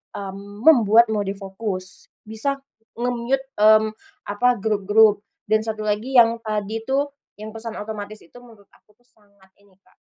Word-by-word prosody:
mmm, 200 +2 -8
membuat 235 -6 +6
mode 205 -2 -1
fokus, 195 -1 -6 0.2
bisa 220 +6 -3 0.4
nge-mute, 245 +2 -1 0.2
mmm, 215 0 +5 0.4
apa, 225 +5 +2
grup-grup 210 +1 +3 0.3
dan 215 0 +4
satu 215 -1 -4
lagi 215 +5 -2
yang 230 -1 +6
tadi 215 -1 -3
itu, 275 +4 0 0.3
yang 215 +1 -8
pesan 225 0 -7
otomatis 210 0 -7
itu 170 - -17
menurut 225 -5 -18
aku 210 - -27
tuh 245 - -36
sangat 200 -4 -28
ini, 200 -2 -27
Kak, - - -30
215 Hz, 150 wpm, -22 LUFS, 205-230 Hz, 0.4 s, membuat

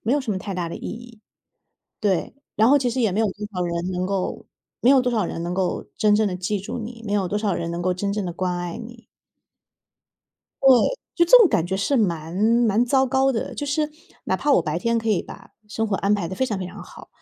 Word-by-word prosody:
没 235 - 0
有 290 - +2
什 235 - -4
么 190 - -1
太 195 0 -6
大 175 -2 -2
的 - - -6
意 - - -11
义。 235 -1 -10 0.8
对， 195 +3 0 0.2
然 220 +2 +4
后 285 - +6
其 250 -3 0
实 255 +2 -2
也 220 -5 +2
没 205 - -1
有 225 - +3
多 210 +2 -6
少 180 - -2
人 170 +1 -2
能 180 0 -2
够 195 -1 -3 0.4
没 245 - +4
有 275 -1 +7
多 250 -1 0
少 215 -4 +1
人 165 - -5
能 175 +1 -3
够 185 -1 -1
真 210 -1 +4
正 215 -1 +2
地 180 - -3
记 190 +3 -2
住 200 +5 -5
你， 230 +1 -8
没 205 - -2
有 195 -3 +1
多 205 - -1
少 210 -3 0
人 170 - -3
能 170 +1 -3
够 180 0 +1
真 200 +2 -2
正 205 -2 -2
地 175 - -3
关 180 0 -2
爱 175 -1 -4
你。 235 -1 -11 1.6
对， 270 - +6 0.5
就 340 - +4
这 - - +8
种 420 -7 +6
感 165 - +1
觉 190 +1 -2
是 265 +8 +1
蛮 170 -6 -1
蛮 225 +2 +3
糟 265 +1 +2
糕 265 +1 +2
的， 225 - -3
就 290 - -4
是 300 +2 0 0.3
哪 - - 0
怕 295 - -1
我 - - +4
白 - - -2
天 230 -1 +1
可 225 0 -3
以 210 - +2
把 - - -12 0.2
生 220 +1 -2
活 195 -2 0
安 200 +1 +1
排 190 -5 -2
得 190 - -5
非 260 - 0
常 210 -6 -2
非 185 - -4
常 - - -9
好， - - -13
210 Hz, 280 characters per minute, -23 LUFS, 185-240 Hz, 1.6 s, 这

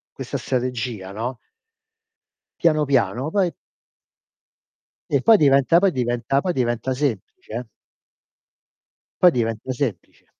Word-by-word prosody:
Questa - - -4
strategia, 125 -6 -3
no? 115 +5 -4 1.2
Piano 155 -3 +3
piano, 130 0 +1
poi 185 -3 +1 1.6
E - - +2
poi 225 -1 +6
diventa 140 +1 +4
poi 195 0 +3
diventa 125 0 0
poi 180 +2 -1
diventa 125 -1 -1
semplice 130 -9 -4
eh? 120 +2 -4 1.6
Poi 180 - +7
diventa 115 -1 -2
semplice. 125 -4 -5
130 Hz, 105 wpm, -22 LUFS, 120-150 Hz, 1.6 s, Poi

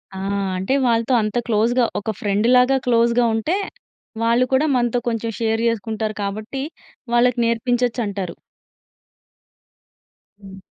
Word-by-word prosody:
ఆ! - - -5 0.4
అంటే 190 +8 -1
వాళ్ళతో 230 +1 +1
అంత 215 +2 -2
క్లోజ్‌గా 235 +2 +2
ఒక 220 +2 -3
ఫ్రెండ్‌లాగా 250 +6 +3
క్లోజ్‌గా 235 0 +3
ఉంటే, 310 - 0 0.7
వాళ్ళు 235 +2 +3
కూడా 280 +4 +3
మనతో 240 0 +1
కొంచెం 230 0 -2
షేర్ 225 0 0
చేసుకుంటారు 220 -1 -2
కాబట్టి 215 +7 -4 0.5
వాళ్ళకి 240 +1 +3
నేర్పించొచ్చంటారు. 230 -5 -1 2.0
హ్మ్. 195 -1 -11
230 Hz, 105 wpm, -21 LUFS, 215-245 Hz, 2.0 s, ఫ్రెండ్‌లాగా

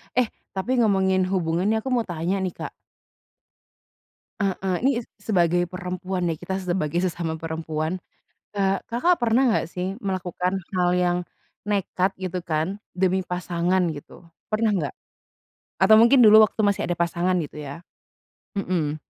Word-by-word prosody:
Eh, 250 -2 +3 0.3
tapi 245 +7 0
ngomongin 190 -4 +3
hubungan 180 0 0
nih 220 0 +2
aku 265 - -3
mau 240 -4 +1
tanya 175 +3 -1
nih, 185 -2 -2
Kak. - - -6 1.7
Heeh, 190 -2 -1
ini 270 +3 +3
s - - -23
sebagai 175 -4 +2
perempuan 180 +1 -4
ya, 160 - -2
kita 190 +2 -4
sebagai 175 -4 -1
sesama 170 -3 -2
perempuan. 160 +1 -3 0.5
Ka 195 -1 +1
Kakak 335 +10 +2
pernah 240 +2 +3
enggak 220 - +1
sih 185 +3 -3
melakukan 185 -3 -2 0.2
hal 180 -1 +3
yang 180 -1 +2 0.5
nekat 195 -2 0
gitu 185 -1 -3
kan, 160 +5 -1 0.2
demi 185 0 +1
pasangan, 180 +1 0 0.2
gitu, 165 +3 -14 0.2
pernah 220 0 +2
enggak? 165 -10 -1 0.9
Atau 215 +3 +7
mungkin 235 +3 +6
dulu 215 -1 +9
waktu 215 +1 -3
masih 200 -1 +1
ada 175 - -1
pasangan, 170 +1 0
gitu 150 - -8
ya. 145 +2 -7 0.8
Mhm. 175 -6 -1
185 Hz, 145 wpm, -24 LUFS, 175-200 Hz, 1.7 s, dulu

